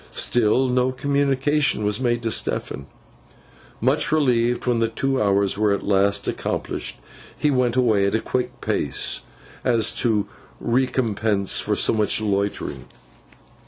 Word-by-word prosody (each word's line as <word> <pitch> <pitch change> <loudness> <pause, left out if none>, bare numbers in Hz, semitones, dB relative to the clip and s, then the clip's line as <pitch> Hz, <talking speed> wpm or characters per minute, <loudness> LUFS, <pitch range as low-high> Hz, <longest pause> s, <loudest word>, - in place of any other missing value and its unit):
Still, 120 +2 +2
no 125 0 +1
communication 140 -1 0
was 105 +2 0
made 120 -2 0
to 115 - -1
Stephen. 70 -8 -2 0.9
Much 135 +7 +2
relieved 125 -6 +1
when 120 -2 +1
the 115 - +2
two 135 +4 -1
hours 100 -1 +1
were 105 -1 +3
at 100 - -3
last 100 0 +1
accomplished, - - -3 0.4
he 150 - +1
went 125 -3 +1
away 110 -6 +3
at 100 - 0
a - - +2
quick 125 +2 -3
pace, - - -1 0.4
as 115 -3 +1
a 110 -4 +2 0.4
recompense 115 -5 0
for - - -1
so - - +2
much 110 -1 +1
loitering. 100 -1 -2
115 Hz, 135 wpm, -22 LUFS, 105-130 Hz, 0.9 s, were